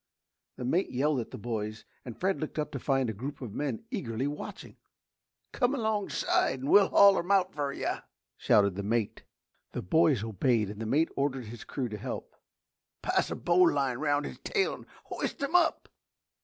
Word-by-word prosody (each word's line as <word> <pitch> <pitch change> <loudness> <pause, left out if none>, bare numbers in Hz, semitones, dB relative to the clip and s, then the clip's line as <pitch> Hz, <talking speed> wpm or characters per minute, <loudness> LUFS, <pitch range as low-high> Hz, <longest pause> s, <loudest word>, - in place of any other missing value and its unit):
The 125 - -5
mate 170 +9 +1
yelled 140 +2 +1
at 115 - -5
the - - -8
boys 110 -1 -4 0.2
and 120 -3 -9
Fred 190 -1 0
looked 155 - -5
up 150 -1 -2
to 140 - -4
find 135 -1 +1
a 110 - -2
group 130 +8 -6
of 120 -6 -7
men 140 - -3
eagerly 130 - -2
watching. 145 +1 -6 0.7
"Come 255 +1 +1
alongside 215 - 0
and 135 - -3
we'll 200 -1 +7
haul 200 -1 +6
him 175 - -5
out 195 -2 +3
fer 145 -2 -2
you!" - - -2 0.4
shouted 100 -2 +3
the 100 - -4
mate. 110 +1 -1 0.5
The - - -4
boys 150 - +3
obeyed 110 0 +1
and 105 +1 -8
the 110 - -3
mate 155 +8 +2
ordered 135 -3 -1
his 115 +2 -9
crew 130 -3 -3
to 105 -2 -6
help. - - -6 0.7
"Pass - - +1
a - - -3
bo'line 145 -8 +2
'round 145 -1 +1
his - - -7
tail 405 -2 0
and - - -11 0.2
hoist - - -4
'im 280 - -2
up!" 350 -2 +3
140 Hz, 185 wpm, -29 LUFS, 115-175 Hz, 0.7 s, we'll